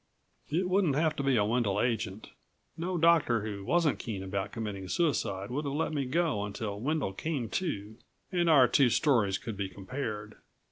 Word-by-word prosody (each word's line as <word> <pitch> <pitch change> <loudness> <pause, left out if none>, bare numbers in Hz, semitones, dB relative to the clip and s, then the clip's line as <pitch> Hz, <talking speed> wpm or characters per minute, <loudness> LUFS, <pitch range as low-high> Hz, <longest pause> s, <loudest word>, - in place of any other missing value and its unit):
It 175 +6 0
wouldn't 185 -6 +2
have 155 +1 +2
to - - 0
be 135 -1 +2
a 105 - +3
Wendel 105 -3 +1
agent. 110 -4 -2 0.4
No 175 +2 -2
doctor 160 -9 +4
who 100 -2 -5
wasn't 165 - +2
keen 100 -5 -4
about 95 +1 -3
committing 105 -4 -5
suicide 100 - 0
would 145 +4 -2
have 140 -1 -3
let 155 +1 -1
me 140 -3 -1
go 150 -6 0
until 100 0 -4
Wendel 140 -4 -1
came 140 0 -3
to, 110 - -3 0.3
and 175 -2 +2
our 135 -5 +7
two 125 +1 +4
stories 115 -8 +2
could 115 0 -6
be 100 -1 -3
compared. 105 +1 -5
120 Hz, 180 wpm, -30 LUFS, 105-155 Hz, 0.4 s, our